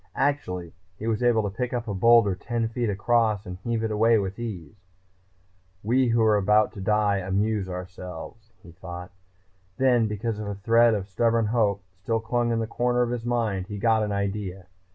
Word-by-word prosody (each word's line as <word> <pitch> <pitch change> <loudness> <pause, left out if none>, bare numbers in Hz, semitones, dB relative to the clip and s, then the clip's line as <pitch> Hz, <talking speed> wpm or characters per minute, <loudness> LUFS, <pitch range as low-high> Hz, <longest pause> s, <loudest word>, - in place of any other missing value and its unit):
Actually, 90 - -1 0.2
he 110 - -7
was 115 -1 0
able 120 -3 +3
to 100 -1 -4
pick 125 -1 -2
up 120 -1 -3
a 105 - -2
boulder 115 0 +5
ten 115 +4 -2
feet 115 0 -2
across 110 +1 +1
and 90 -1 -7
heave 115 +2 -2
it 110 - -1
away 115 +2 +4
with 100 +1 -3
ease. 100 -6 -7 1.0
We 125 +4 +2
who 115 -1 +2
are 110 -1 +4
about 105 +2 +3
to 100 - -8
die 105 0 +2
amuse 95 +1 -1
ourselves, 90 +4 -8
he 85 - -13
thought. 90 +1 -9 0.7
Then, 125 -4 +3
because 105 +1 -3
a 100 -1 -4
thread 115 +3 +4
of 100 -2 -4
stubborn 115 +3 +1
hope 105 -3 +1 0.2
still 115 +3 0
clung 120 +1 -1
in 115 - 0
a - - -1
corner 120 +2 0
of 120 - -2
his 120 -1 -4
mind, 110 -6 -1
he 105 -1 -6
got 110 +1 +2
an 105 -1 -1
idea. 100 -2 -3
110 Hz, 190 wpm, -25 LUFS, 100-115 Hz, 1.0 s, boulder